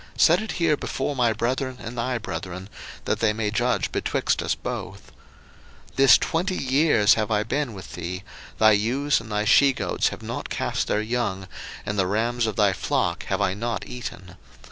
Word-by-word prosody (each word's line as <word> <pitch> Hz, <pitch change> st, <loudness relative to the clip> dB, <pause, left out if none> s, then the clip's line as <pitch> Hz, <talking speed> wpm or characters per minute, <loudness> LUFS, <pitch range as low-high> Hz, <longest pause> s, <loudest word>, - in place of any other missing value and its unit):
set 175 Hz, +4 st, +5 dB
it 220 Hz, -, -4 dB
here 165 Hz, -4 st, +2 dB
before 140 Hz, 0 st, -3 dB
my 120 Hz, -3 st, +3 dB
brethren 130 Hz, +3 st, -2 dB
and 115 Hz, +1 st, -7 dB
thy 125 Hz, +1 st, -1 dB
brethren, 95 Hz, -4 st, -6 dB, 0.4 s
that -, -, 0 dB
they 110 Hz, -2 st, +3 dB
may 105 Hz, -1 st, -1 dB
judge 120 Hz, +3 st, 0 dB
betwixt -, -, 0 dB
us -, -, 0 dB
both. -, -, -6 dB, 0.8 s
01:031:038 -, -, -26 dB
This 135 Hz, -1 st, +8 dB
twenty 180 Hz, +3 st, -1 dB
years 130 Hz, -6 st, +4 dB
have 110 Hz, -2 st, -1 dB
I 105 Hz, -1 st, +1 dB
been 130 Hz, 0 st, -2 dB
with 95 Hz, -, -10 dB
thee; 90 Hz, +2 st, -5 dB, 0.3 s
thy 110 Hz, 0 st, +6 dB
ewes 120 Hz, +7 st, +1 dB
and 110 Hz, -1 st, -11 dB
thy 105 Hz, 0 st, 0 dB
she 140 Hz, +4 st, +5 dB
goats -, -, 0 dB
have -, -, -5 dB
not -, -, -5 dB
cast -, -, -2 dB
their 105 Hz, -, +1 dB
young, 110 Hz, -5 st, -2 dB, 0.4 s
and 105 Hz, -1 st, -2 dB
the 95 Hz, -, +2 dB
rams 115 Hz, +4 st, 0 dB
of 110 Hz, -, -3 dB
thy 100 Hz, -2 st, +3 dB
flock -, -, -1 dB
have 100 Hz, +1 st, -1 dB
I 95 Hz, -2 st, +2 dB
not 115 Hz, +2 st, -3 dB
eaten. 95 Hz, -7 st, -8 dB
115 Hz, 190 wpm, -24 LUFS, 105-130 Hz, 0.8 s, This